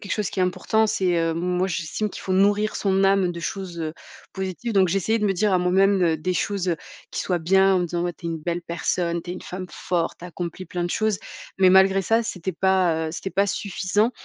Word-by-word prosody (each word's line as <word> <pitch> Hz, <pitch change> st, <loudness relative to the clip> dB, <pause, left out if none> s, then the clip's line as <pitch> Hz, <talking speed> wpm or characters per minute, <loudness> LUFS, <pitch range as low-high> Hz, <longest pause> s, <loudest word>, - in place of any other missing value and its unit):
quelque 200 Hz, -, -9 dB
chose 210 Hz, -3 st, -1 dB
qui 185 Hz, -, -3 dB
est -, -, +4 dB
important, 220 Hz, +4 st, +1 dB
c'est, 185 Hz, -5 st, +1 dB
heu, 165 Hz, -1 st, 0 dB
moi, 180 Hz, +2 st, 0 dB
j'estime 175 Hz, +4 st, -2 dB
qu'il -, -, -9 dB
faut 185 Hz, -, -2 dB
nourrir 205 Hz, +3 st, +3 dB
son 195 Hz, -1 st, +1 dB
âme 195 Hz, -2 st, +3 dB
de 170 Hz, -, -7 dB
choses, 175 Hz, -1 st, -5 dB
heu, 155 Hz, -1 st, -3 dB, 0.4 s
positives 190 Hz, +5 st, -4 dB
donc 190 Hz, -2 st, +4 dB
j'essayais 200 Hz, +5 st, +1 dB
de 210 Hz, -, +1 dB
me 195 Hz, -, +2 dB
dire 205 Hz, +2 st, +1 dB
à 185 Hz, -, +4 dB
moi-même, 190 Hz, +2 st, +3 dB
heu, 165 Hz, -2 st, +3 dB
des 185 Hz, +4 st, -2 dB
choses, 190 Hz, 0 st, -1 dB
heu, 165 Hz, -, 0 dB, 0.3 s
qui -, -, -3 dB
soient 180 Hz, -2 st, 0 dB
bien, 190 Hz, +3 st, +4 dB
en -, -, +3 dB
me -, -, 0 dB
disant: 175 Hz, 0 st, -2 dB
«Ouais, 175 Hz, -1 st, -2 dB
tu 170 Hz, -, -21 dB
es -, -, -1 dB
une 165 Hz, -, -3 dB
belle 170 Hz, +2 st, -3 dB
personne. 170 Hz, 0 st, -1 dB
Tu 175 Hz, -, -8 dB
es -, -, -3 dB
une -, -, -9 dB
femme 185 Hz, 0 st, -6 dB
forte, 170 Hz, -2 st, -2 dB
tu 175 Hz, -, -9 dB
as -, -, -6 dB
accompli 175 Hz, +1 st, -6 dB
plein 175 Hz, -1 st, -3 dB
de 175 Hz, -, -2 dB
choses». 215 Hz, -2 st, 0 dB, 0.4 s
Mais 185 Hz, -, +6 dB
malgré 190 Hz, +1 st, +5 dB
ça, 225 Hz, +5 st, +2 dB
c'était 190 Hz, -5 st, -4 dB
pas, 175 Hz, -3 st, +2 dB
heu, -, -, -7 dB
c'était 180 Hz, -, -4 dB
pas 200 Hz, +1 st, +2 dB
suffisant 205 Hz, +3 st, 0 dB
185 Hz, 255 wpm, -24 LUFS, 175-195 Hz, 0.4 s, Mais